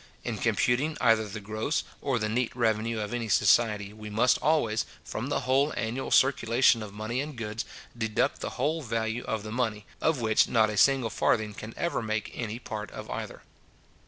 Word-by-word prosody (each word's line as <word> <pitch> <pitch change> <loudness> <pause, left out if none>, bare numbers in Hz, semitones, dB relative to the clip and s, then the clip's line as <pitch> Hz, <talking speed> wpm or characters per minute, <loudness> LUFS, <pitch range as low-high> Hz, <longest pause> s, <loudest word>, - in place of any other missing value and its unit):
In - - -3
computing 140 +6 +1
either 115 -3 +3
the 105 +2 -6
gross 110 +8 -2 0.2
or 135 -3 0
the 110 -2 -1
neat 120 +2 -1
revenue 115 -1 0
of 105 +2 -4
any 115 -2 -2
society, 105 0 +3
we 105 0 -9
must 120 +4 +3
always, 130 -9 +2 0.2
from - - -4
the - - 0
whole 135 +3 +2
annual 120 +4 -2
circulation 125 -3 +4
of 105 -2 -7
money 110 +5 -3
and 145 -2 -6
goods, 110 -1 -4 0.3
deduct 110 -2 0
the - - -2
whole 155 +5 0
value 115 -1 -2
of 110 -2 -2
the 110 - -6
money, 110 -4 -1 0.2
of 160 -4 +2
which 110 -2 +3
not 110 -2 +3
a - - -4
single 135 -3 +4
farthing 110 -2 +1
can 110 +2 -9
ever 170 - -1
make 110 -1 -2
any 115 -2 -4
part 110 -3 -6
of - - -8
either. - - -6
115 Hz, 190 wpm, -28 LUFS, 110-125 Hz, 0.3 s, circulation